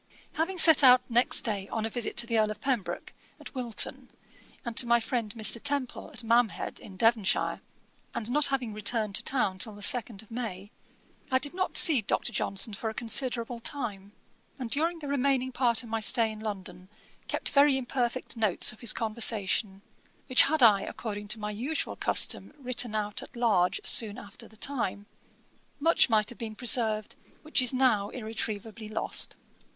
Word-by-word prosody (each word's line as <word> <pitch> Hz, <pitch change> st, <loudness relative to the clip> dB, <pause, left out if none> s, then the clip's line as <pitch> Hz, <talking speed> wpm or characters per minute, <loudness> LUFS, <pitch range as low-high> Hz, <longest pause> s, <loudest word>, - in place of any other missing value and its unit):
"' -, -, -30 dB
Having 370 Hz, +3 st, -2 dB
set 320 Hz, -4 st, +8 dB
out 250 Hz, -1 st, +8 dB
next 240 Hz, +1 st, +4 dB
day 200 Hz, -4 st, -3 dB
on 220 Hz, -1 st, -3 dB
a -, -, -2 dB
visit 240 Hz, 0 st, -4 dB
to 240 Hz, -, +3 dB
the 230 Hz, -1 st, 0 dB
Earl 215 Hz, -1 st, +2 dB
of 215 Hz, 0 st, -6 dB
Pembroke, 245 Hz, -6 st, -3 dB, 0.3 s
at -, -, -11 dB
Wilton, 245 Hz, -5 st, 0 dB, 0.6 s
and 235 Hz, -1 st, -5 dB
to 245 Hz, -, +5 dB
my 235 Hz, 0 st, +4 dB
friend, 225 Hz, -2 st, -3 dB
Mr. 220 Hz, 0 st, +2 dB
Temple, 280 Hz, -3 st, -2 dB
at 250 Hz, -5 st, -9 dB
Mamhead, 230 Hz, -1 st, +1 dB
in 190 Hz, -2 st, -13 dB
Devonshire, 225 Hz, -2 st, +1 dB, 0.5 s
and 230 Hz, +1 st, -3 dB
not 295 Hz, +2 st, +3 dB
having 255 Hz, -5 st, -2 dB
returned 215 Hz, 0 st, -2 dB
to -, -, -1 dB
town 195 Hz, -8 st, -1 dB
till 215 Hz, +1 st, 0 dB
the 205 Hz, -, -8 dB
second 230 Hz, -4 st, 0 dB
of 220 Hz, -, -22 dB
May, 210 Hz, -4 st, -6 dB, 0.6 s
I 260 Hz, -, +3 dB
did 285 Hz, +3 st, 0 dB
not 370 Hz, +1 st, -2 dB
see 295 Hz, -8 st, +2 dB
Dr. 225 Hz, +3 st, -2 dB
Johnson 200 Hz, +2 st, 0 dB
for 220 Hz, +2 st, -4 dB
a 220 Hz, -, -8 dB
considerable 235 Hz, 0 st, -1 dB
time, 210 Hz, -7 st, -5 dB, 0.4 s
and 250 Hz, -4 st, -6 dB
during 330 Hz, +6 st, 0 dB
the 300 Hz, -3 st, -8 dB
remaining 270 Hz, -2 st, 0 dB
part 245 Hz, -2 st, 0 dB
of 235 Hz, -, -12 dB
my 225 Hz, 0 st, -2 dB
stay 225 Hz, 0 st, +2 dB
in 215 Hz, -, -9 dB
London, 190 Hz, -4 st, -7 dB, 0.4 s
kept -, -, -3 dB
very 280 Hz, -1 st, +4 dB
imperfect 255 Hz, -1 st, -2 dB
notes 215 Hz, -5 st, +2 dB
of 215 Hz, -, -18 dB
his 235 Hz, -, +3 dB
conversation, 215 Hz, -3 st, -1 dB, 0.4 s
which 255 Hz, -, +6 dB
had 310 Hz, -2 st, +2 dB
I 205 Hz, -4 st, +6 dB
according 205 Hz, 0 st, -6 dB
to 220 Hz, -, -5 dB
my 210 Hz, 0 st, -4 dB
usual 255 Hz, +9 st, -3 dB
custom -, -, +1 dB
written 250 Hz, -4 st, 0 dB
out 210 Hz, -1 st, -3 dB
at -, -, -13 dB
large 200 Hz, -6 st, +1 dB
soon 215 Hz, -3 st, +4 dB
after 205 Hz, -, -10 dB
the 220 Hz, -, -21 dB
time, 210 Hz, -6 st, -2 dB, 0.7 s
much 330 Hz, -2 st, +3 dB
might 215 Hz, -1 st, +2 dB
have 240 Hz, -, -7 dB
been 220 Hz, -2 st, -6 dB
preserved, 225 Hz, -3 st, +1 dB, 0.3 s
which 310 Hz, -3 st, 0 dB
is 250 Hz, -, +2 dB
now 250 Hz, -6 st, +1 dB
irretrievably 220 Hz, -1 st, -5 dB
lost. 215 Hz, -, -1 dB
230 Hz, 180 wpm, -28 LUFS, 215-255 Hz, 0.7 s, set